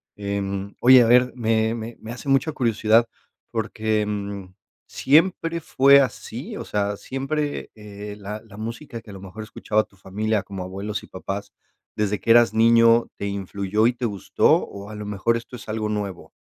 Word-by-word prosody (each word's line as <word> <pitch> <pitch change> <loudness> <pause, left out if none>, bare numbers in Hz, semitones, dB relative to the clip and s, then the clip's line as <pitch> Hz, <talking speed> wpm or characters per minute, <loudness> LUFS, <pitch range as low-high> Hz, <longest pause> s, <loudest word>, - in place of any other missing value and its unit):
em, 100 -1 -3
oye, 125 0 +8
a - - +2
ver, 125 +1 +5
me 110 -1 +1
me 115 0 -6
me 110 - -7
hace 125 +4 -9
mucha 135 +3 +2
curiosidad, 115 -3 +2 0.4
porque, 110 -1 -1
mm, 100 -2 -4 0.4
¿siempre 165 +2 +2
fue 140 -1 +6
así?, 125 -5 -4
o - - -6
sea, 100 0 -1
¿siempre, 145 +4 -3
eh, 105 -1 -9
la 105 +1 -7
la 105 -2 -15
música 115 +2 -6
que 105 - -13
a - - -10
lo 95 - -10
mejor 95 +3 -8
escuchaba 110 0 -1
tu 100 - -24
familia, 105 +3 -2
como 95 -2 -7
abuelos 100 +3 -5
y - - -12
papás, 100 +2 -6 0.4
desde 105 -1 0
que - - -7
eras 120 -3 +6
niño, 115 +1 +5
te - - -5
influyó 100 +2 0
y 125 - +1
te 125 - -9
gustó? 100 -5 +1 0.2
¿O 100 +1 -10
a 110 - -8
lo 105 - -6
mejor 105 +3 0
esto 115 +2 -9
es 115 - -11
algo 110 0 -2
nuevo? 105 -4 -4
110 Hz, 180 wpm, -23 LUFS, 100-115 Hz, 0.4 s, oye